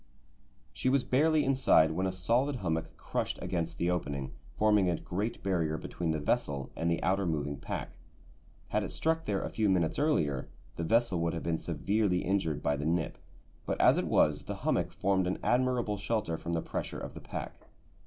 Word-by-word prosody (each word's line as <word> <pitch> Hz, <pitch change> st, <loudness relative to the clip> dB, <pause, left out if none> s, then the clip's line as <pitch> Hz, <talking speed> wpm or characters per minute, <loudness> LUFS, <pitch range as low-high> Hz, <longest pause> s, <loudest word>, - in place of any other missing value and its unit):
She 130 Hz, -, 0 dB
was 135 Hz, -1 st, +3 dB
barely 150 Hz, +5 st, +3 dB
inside 130 Hz, -12 st, +4 dB
when 95 Hz, +4 st, 0 dB
a -, -, -1 dB
solid 120 Hz, +10 st, +1 dB
hummock 80 Hz, -8 st, -2 dB
crushed -, -, -2 dB
against 85 Hz, -2 st, -2 dB
the 85 Hz, +1 st, +1 dB
opening, 70 Hz, -6 st, -2 dB, 0.3 s
forming 105 Hz, -3 st, +4 dB
a 85 Hz, -, +1 dB
great 105 Hz, +6 st, -3 dB
barrier 85 Hz, -5 st, 0 dB
between 85 Hz, +2 st, -4 dB
the 80 Hz, -, +1 dB
vessel 70 Hz, -2 st, -1 dB
and 85 Hz, +1 st, 0 dB
the 85 Hz, -, 0 dB
outer 95 Hz, 0 st, +1 dB
moving 75 Hz, -3 st, -1 dB
pack. 70 Hz, -, -5 dB, 0.8 s
Had -, -, +1 dB
it -, -, -4 dB
struck 160 Hz, 0 st, 0 dB
there 100 Hz, -2 st, -1 dB
a -, -, -3 dB
few 110 Hz, -2 st, +1 dB
minutes 85 Hz, -4 st, +1 dB
earlier 80 Hz, -, +1 dB, 0.3 s
the 85 Hz, -, -3 dB
vessel 115 Hz, 0 st, +2 dB
would 85 Hz, 0 st, 0 dB
have 85 Hz, -, -4 dB
been 80 Hz, -1 st, 0 dB
severely 90 Hz, +3 st, 0 dB
injured 95 Hz, -6 st, 0 dB
by 75 Hz, -, +2 dB
the 75 Hz, +1 st, -4 dB
"nip," 85 Hz, -1 st, -1 dB, 0.5 s
but -, -, -1 dB
as -, -, +6 dB
it -, -, -1 dB
was 75 Hz, -1 st, +3 dB
the -, -, -4 dB
hummock -, -, +1 dB
formed 95 Hz, -2 st, +1 dB
an 90 Hz, -, -1 dB
admirable 125 Hz, -4 st, +1 dB
shelter 100 Hz, -5 st, -1 dB
from 85 Hz, +1 st, -4 dB
the 80 Hz, -, 0 dB
pressure -, -, -4 dB
of -, -, -6 dB
the -, -, -9 dB
pack. -, -, -7 dB
90 Hz, 195 wpm, -31 LUFS, 80-110 Hz, 0.8 s, as